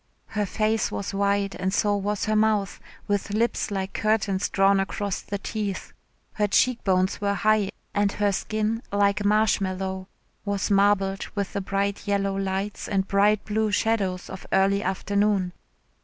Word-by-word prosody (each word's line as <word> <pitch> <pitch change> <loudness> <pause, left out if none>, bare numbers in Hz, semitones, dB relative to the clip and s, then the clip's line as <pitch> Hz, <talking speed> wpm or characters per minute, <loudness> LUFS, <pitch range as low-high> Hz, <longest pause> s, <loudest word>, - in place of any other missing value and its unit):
Her 210 -1 -1
face 215 +3 0
was 200 - -4
wide 200 0 +1
and 190 +1 0
so 205 +1 +2
was 205 0 -1
her 215 0 +1
mouth 215 -2 +1 0.3
with 205 0 -1
lips 230 +1 0
like 195 -1 -3
curtains 210 -3 0
drawn 195 0 +3
across 195 0 -2
the 200 - -4
teeth. 200 -1 -4 0.4
Her 210 -1 +1
cheek 250 +4 +2
bones 185 0 +1
were 200 0 +1
high 215 -1 +2 0.2
and 205 -1 +2
her 205 -1 +1
skin, 215 +3 -1
like 200 0 +2
marshmallow, 190 -3 +1 0.4
was 200 -1 -1
marbled 195 -1 +2
with 200 -2 -2
the 200 - -1
bright 200 +1 -2
yellow 200 -1 0
lights 195 +1 -3
and 195 -1 0
bright 205 +1 +3
blue 215 0 0
shadows 195 -3 0
of 190 - -9
early 195 +1 +3
afternoon. 200 -1 0
200 Hz, 155 wpm, -25 LUFS, 195-210 Hz, 0.4 s, drawn